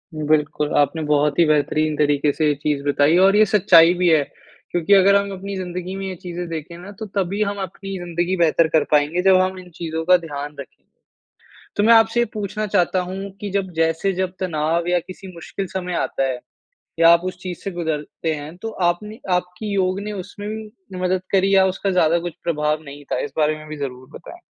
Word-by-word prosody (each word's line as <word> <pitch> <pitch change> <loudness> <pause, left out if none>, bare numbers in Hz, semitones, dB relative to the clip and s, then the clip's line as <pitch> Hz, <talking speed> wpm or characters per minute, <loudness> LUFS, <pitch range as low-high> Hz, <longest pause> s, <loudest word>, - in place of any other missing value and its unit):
बिल्कुल 150 -1 0
आपने 145 +3 +2
बहुत 150 0 +1
ही 170 - +6
बेहतरीन 155 0 +1
तरीके 145 -1 +2
से 155 - +1
ये 150 - +3
चीज़ 145 -2 -1
बताई 145 +3 +3
और 195 +1 +4
ये 215 +1 +6
सच्चाई 180 -4 +6
भी 180 0 +1
है। 155 -3 +4 0.5
क्योंकि 175 +3 +2
अगर 195 0 +6
हम 200 0 +1
अपनी 195 +1 -6
ज़िन्दगी 180 0 -5
में 195 0 -5
ये 190 - -4
चीज़ें 175 -1 -6
देखें 165 +1 -6
ना 180 +3 -10
तो 220 - -4
तभी 195 +1 -1
हम 205 0 -3
अपनी 195 +1 -6
ज़िन्दगी 175 +1 -2
बेहतर 165 -1 +3
कर 160 - +4
पाएँगे 150 +4 +2
जब 190 0 +5
हम 185 0 -1
इन 180 -1 -13
चीज़ों 160 -1 -4
का 180 0 +6
ध्यान 145 -4 -6
रखेंगे। 140 - -11 0.9
तो 205 - +2
मैं 230 - +6
आपसे 225 +1 +4
ये 240 - +2
पूछना 210 0 -3
चाहता 185 -1 +1
हूँ 195 +2 -6
कि 205 - -4
जब 190 -1 -2
जैसे 165 +4 +1
जब 185 0 -2
तनाव 170 -1 -1
या 180 0 +3
किसी 185 +2 -11
मुश्किल 180 +3 -6
समय 180 -1 -3
आता 135 - -1
है 125 - -4 0.6
या 165 - +7
आप 170 0 +6
उस 185 -1 -4
चीज़ 180 -2 -6
से 195 - -3
गुजरते 160 -1 -3
हैं 150 +3 -8
तो 225 - -4 0.2
आपने 210 +6 -5 0.2
आपकी 180 +4 -4
योग 190 0 0
ने 210 +1 -5
उसमें 205 +1 -7
भी 215 -3 -9
मदद 185 0 0
करी 195 0 +3
या 190 - +6
उसका 190 +1 -2
ज़्यादा 170 -2 +3
कुछ 175 0 -5
प्रभाव 150 -1 0
नहीं 145 0 -11
था - - 0
इस 145 - -5
बारे 155 0 +2
में 155 0 -12
भी 155 - -6
ज़रूर 130 -2 -6
बताएँ? - - -11
175 Hz, 215 wpm, -21 LUFS, 155-195 Hz, 0.9 s, या